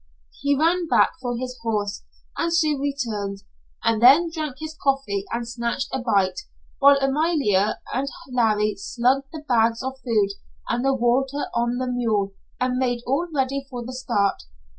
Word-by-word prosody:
He 285 0 +2
ran 335 +3 +2
back - - +4
for 245 -2 -2
his 255 +1 -4
horse 210 -3 -2 0.3
and 335 - -1
soon 310 -4 +2
returned, 220 -9 -3 0.4
and 225 -1 +2
then 295 +8 +7
drank 305 -5 -3
his 315 0 -6
coffee 270 - 0
and 235 0 -2
snatched 235 +2 -2
a 265 - 0
bite, 200 -6 +1 0.4
while 280 0 +7
Amalia 270 - +1
and 275 +2 -1 0.2
Larry 215 -4 +2
slung 250 +6 +1
the 315 -2 -8
bags 230 -1 +2
of 265 0 -5
food 215 -5 +2 0.4
and 240 +1 -1
the 270 0 +2
water 265 +3 +1
on 240 +1 0
the 255 - -1
mule 225 -6 0 0.3
and 250 0 0
made 245 -2 0
all 280 +8 0
ready 275 -1 -1
for 245 -2 -6
the 255 - -6
start. 205 -6 0
250 Hz, 160 wpm, -23 LUFS, 225-275 Hz, 0.4 s, then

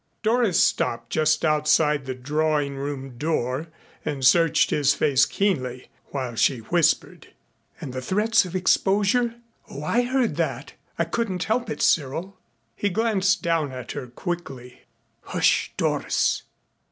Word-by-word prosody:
Doris 225 -4 +2
stopped 115 0 0
just 155 +1 +2
outside 150 -2 +2
the 130 - -3
drawing 145 +1 -1
room 135 -3 -6
door 145 -1 -1 0.4
and 135 -3 -2
searched 165 +4 +4
his 145 -1 +2
face 140 -2 +3
keenly, 130 -11 -2 0.2
while 130 -4 -4
she 125 +3 +2
whispered: 160 +9 0 0.5
"And 130 - -7
the 130 - -4
threats 215 - +2
of 180 0 -8
exposure. 205 +6 +2 0.3
Oh, 140 - -7
I 230 +10 +2
heard 250 0 0
that. - - -3 0.2
I - - +2
couldn't 190 -7 -2
help 235 +3 -1
it 150 - -3
Cyril 165 +6 0 0.2
" 115 0 -46
He 205 - -1
glanced 200 -2 +1
down 165 -4 0
at 125 -1 -7
her 140 -3 -6
quickly. 125 -3 -7 0.4
"Hush, - - +1
Doris." - - 0
155 Hz, 140 wpm, -24 LUFS, 130-195 Hz, 0.5 s, searched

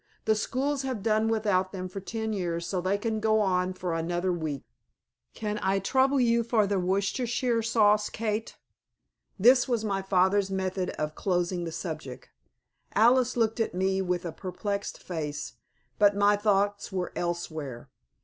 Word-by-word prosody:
"The 220 - +4
schools 270 +6 -1
have 260 -7 -4
done 220 0 +2
without 205 -4 +1
them 185 -2 -5
for 185 +2 -6
ten 220 +2 -3
years 170 -4 -2
so 180 +1 -2
they 190 +3 +1
can 220 +1 -2
go 220 0 +3
on 185 -2 +1
for 180 -2 -3
another 175 +2 -1
week. 155 -5 -3 0.7
Can 210 -1 -3
I 190 +1 +2
trouble 265 +7 +2
you 235 -1 +3
for 225 -2 +2
the 200 -1 0
Worcestershire 230 +6 0
sauce, 210 -2 +3
Kate?" 220 0 -3 0.8
This 245 +5 +5
was 235 -3 0
my 195 -2 -1
father's 190 +1 +2
method 190 -1 -2
of 150 0 -2
closing 175 0 -1
the 165 - -4
subject. 155 -7 -6 0.6
Alice 245 +3 +4
looked 225 0 +1
at 225 - -1
me 190 +1 +1
with 180 -1 -1
perplexed 200 +2 -4
face, 150 -4 -5 0.4
but 205 -1 +5
my 205 +1 +4
thoughts 205 -1 +1
were 185 -2 -2
elsewhere. 155 -7 -4
200 Hz, 155 wpm, -28 LUFS, 180-220 Hz, 0.8 s, This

